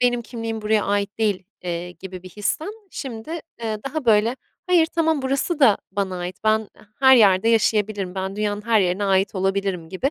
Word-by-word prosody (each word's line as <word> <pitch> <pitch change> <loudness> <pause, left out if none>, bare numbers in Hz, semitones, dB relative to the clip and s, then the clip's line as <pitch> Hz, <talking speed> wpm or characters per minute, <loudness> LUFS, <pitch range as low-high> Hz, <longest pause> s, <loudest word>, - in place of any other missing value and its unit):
"Benim 245 -1 +2
kimliğim 225 -2 -5
buraya 215 0 +2
ait 200 +1 -1
değil." 205 -4 0 0.2
eee, 175 0 -4
gibi 185 0 -9
bir 185 - -10
histen 210 - -2 0.2
şimdi, 245 -2 -7 0.3
eee, 220 -2 -2
daha, 310 0 -4
böyle, 225 +2 +3 0.3
"Hayır, 350 -3 +4
tamam 320 -3 0
burası 275 +5 -1
da 225 -7 +6
bana 190 -2 -2
ait, 180 +1 -5
ben 215 -1 +2 0.3
her 265 -1 +8
yerde 200 -2 +5
yaşayabilirim, 210 -4 +1
ben 190 +1 -4
dünyanın 210 0 -1
her 225 -2 +4
yerine 185 +2 0
ait 195 +1 +2
olabilirim." 190 -3 -1
gibi, 195 +11 -1
210 Hz, 180 wpm, -22 LUFS, 190-235 Hz, 0.3 s, her